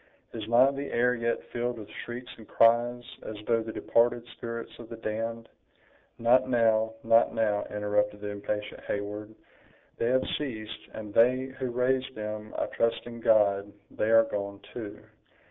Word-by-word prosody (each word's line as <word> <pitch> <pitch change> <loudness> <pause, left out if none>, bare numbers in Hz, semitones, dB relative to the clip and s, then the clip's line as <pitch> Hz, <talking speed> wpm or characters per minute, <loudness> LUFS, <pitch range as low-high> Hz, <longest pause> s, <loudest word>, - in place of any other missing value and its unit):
"Is 110 -2 -5
not 130 +4 +5
the 140 +1 -4
air 125 +1 +3
yet 115 -1 -1
filled 120 0 -1
with 105 -2 -8
shrieks 125 +1 -7
and 110 - -14
cries, 120 +1 +4 0.2
as 110 - -6
though 115 -1 +2
the 110 0 -5
departed 120 +1 +2
spirits 115 0 -6
of 120 - -10
the 115 - -6
damned—" 115 +1 -4 0.7
"Not 125 +2 +4
now, 110 -2 +3
not 115 +1 +4
now," 105 -2 +1
interrupted 105 0 0
the 105 - -4
impatient 105 +1 -4
Heyward, 105 +1 -4 0.6
"they 115 - 0
have 130 +1 +2
ceased, 110 -7 -6
and 105 -2 -7
they 130 +3 +3
who 130 -1 -1
raised 130 +2 0
them, 105 0 -5
I - - +1
trust 115 0 0
in 120 -1 -8
God, 100 -3 +3 0.2
they 110 - -1
are 115 0 +7
gone, 100 -2 -4
too! 110 -4 -7
115 Hz, 160 wpm, -29 LUFS, 105-120 Hz, 0.7 s, are